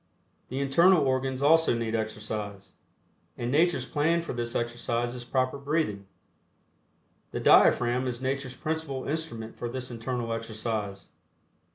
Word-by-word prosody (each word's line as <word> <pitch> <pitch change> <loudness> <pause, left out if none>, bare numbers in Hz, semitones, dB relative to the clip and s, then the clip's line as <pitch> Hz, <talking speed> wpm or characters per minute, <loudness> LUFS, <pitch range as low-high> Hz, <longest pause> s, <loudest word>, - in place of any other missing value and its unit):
The 130 - -3
internal 155 +4 +5
organs 130 0 0
also 160 -2 +5
need 115 -1 -2
exercise, 105 -2 -4 0.7
and 120 +1 -2
Nature's 155 -3 +3
plan 165 +5 +1
for - - -5
this 120 -1 -4
exercise 120 0 -1
is 125 -1 -7
proper 130 +2 0
breathing. 140 -9 -1 1.2
The - - -4
diaphragm 125 +2 +5
is 120 -1 -3
Nature's 130 0 -2
principal 155 -3 -3
instrument 145 -8 -4
for 120 - -3
this 130 +1 -5
internal 120 0 -3
exercise. 110 -3 -4
125 Hz, 130 wpm, -28 LUFS, 115-140 Hz, 1.2 s, internal